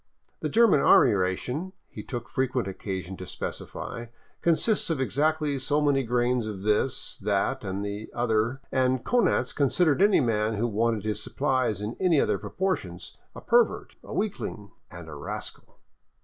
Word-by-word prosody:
The - - -2
German 225 -9 +5
army - - +6
ration, 125 - -2
he - - -8
took 120 -3 -6
frequent 130 -3 -1
occasion 95 -1 -5
to 90 - -8
specify, 120 -1 -6 0.3
consists 175 +6 +2
of 160 -4 0
exactly 145 - +1
so 145 +3 +1
many 145 -2 +2
grams 120 -1 0
of 100 -3 -6
this, 110 +5 0
that, 105 +6 0
and 100 0 -3
the 100 +1 -5
other, 120 +2 0
and 130 -1 +1
Konanz 235 - +2
considered 150 +3 +2
any 205 0 +5
man 110 -3 +1
who 110 +3 0
wanted 115 -1 0
his 105 -1 -2
supplies 130 -8 0
in 110 +3 -4
any 175 -5 +3
other - - +1
proportions 190 0 -3 0.2
a - - -8
pervert, 480 -1 +2
a - - -11
weakling, 190 - -3 0.2
and 85 -2 -10
a 80 - -8
rascal. 75 0 -7
125 Hz, 155 wpm, -27 LUFS, 105-145 Hz, 0.3 s, army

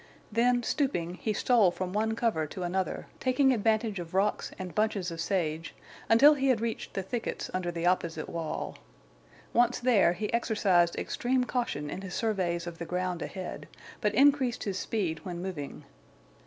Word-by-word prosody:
Then, 240 +2 +3
stooping, 200 - 0
he 220 - 0
stole 220 -2 +4
from 180 +1 -4
one 220 +1 0
cover 220 -10 0
to 180 +5 -6
another, 185 +2 -2
taking 265 +1 +3
advantage 220 -2 +1
of 170 +1 -7
rocks 200 +2 +1
and 185 -2 -6
bunches 210 -4 0
of 165 0 -4
sage, 165 -3 -2 0.3
until 280 +7 +8
he 275 -2 0
had 255 -4 +3
reached 230 0 -4
the 195 - -1
thickets 230 +5 -4
under 185 -1 -1
the 170 0 -3
opposite 170 -3 0
wall. 165 -2 -4 0.7
Once 240 +1 +3
there, 225 -8 +4
he 210 +5 -4
exercised 195 -7 +3
extreme 250 +1 0
caution 240 - -2
in 190 - -5
his 190 -2 -6
surveys 180 -6 0
of 170 -1 -7
the 170 - -4
ground 180 -1 -2
ahead, 185 -2 -6 0.3
but 210 -2 +1
increased 270 -2 +4
his 195 -2 -2
speed 180 -8 -1
when 175 -2 -5
moving. 175 -6 -6
195 Hz, 170 wpm, -29 LUFS, 175-235 Hz, 0.7 s, until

